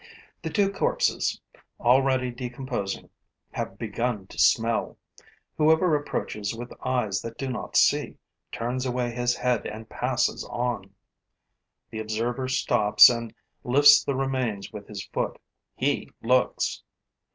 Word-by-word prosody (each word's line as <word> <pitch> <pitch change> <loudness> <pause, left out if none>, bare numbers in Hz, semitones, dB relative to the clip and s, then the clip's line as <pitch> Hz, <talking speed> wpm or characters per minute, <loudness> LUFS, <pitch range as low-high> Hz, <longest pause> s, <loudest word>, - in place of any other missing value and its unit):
The - - -4
two 200 -2 +1
corpses, - - 0 0.4
already 130 0 +3
decomposing, 120 -4 -5 0.4
have 95 - -5
begun 115 -1 -2
to - - -10
smell. 115 0 +2 0.6
Whoever 160 +2 +4
approaches 110 -7 -3
with 120 +1 -8
eyes 110 -7 0
that 115 0 -8
do 135 - -3
not 120 -3 -5
see - - +3 0.3
turns 125 +3 -2
away 125 -1 -1
his 120 0 0
head 125 -4 0
and 110 +1 -8
passes 125 0 0
on. 120 -5 -3 1.0
The 110 - -5
observer 115 +4 -2
stops 130 -5 +6
and 115 -2 -4 0.3
lifts 145 +3 +7
the 140 - -1
remains 130 -7 -2
with 105 -1 -8
his 100 -2 -7
foot; - - -3 0.4
he - - -1
looks. 125 +2 +1
120 Hz, 125 wpm, -26 LUFS, 110-130 Hz, 1.0 s, lifts